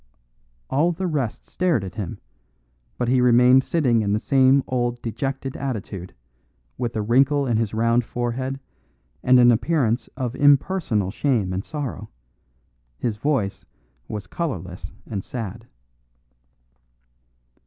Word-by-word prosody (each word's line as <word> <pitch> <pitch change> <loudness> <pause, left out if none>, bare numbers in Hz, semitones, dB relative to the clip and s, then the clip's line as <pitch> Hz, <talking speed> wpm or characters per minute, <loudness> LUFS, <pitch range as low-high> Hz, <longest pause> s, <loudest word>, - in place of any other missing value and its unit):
All 155 +6 +2
the 185 +3 -3
rest 145 -10 -2
stared 175 - 0
at 95 -1 -6
him, 100 -5 -5 0.8
but 120 - -1
he 125 +1 +3
remained 125 +2 +6
sitting 130 -10 +2
in 100 -1 0
the - - +3
same 135 +3 +4
old 120 -1 -1
dejected 135 +3 -3
attitude, 105 -8 -5 0.6
with 120 0 -3
a 110 - -1
wrinkle 135 +5 +3
in 120 -4 +1
his 110 -1 -1
round 115 +2 +2
forehead 125 +3 -3 0.6
and 125 0 +5
an 120 0 +7
appearance 120 -2 +1
of 125 -2 -3
impersonal 140 - +2
shame 110 -6 0
and 95 +2 -2
sorrow; 145 -4 -5 0.9
his 110 - -2
voice 120 -6 -1 0.4
was 105 -2 -5
colourless 95 - -5
and 100 -4 -4
sad. 115 -1 -6
120 Hz, 125 wpm, -23 LUFS, 110-135 Hz, 0.9 s, an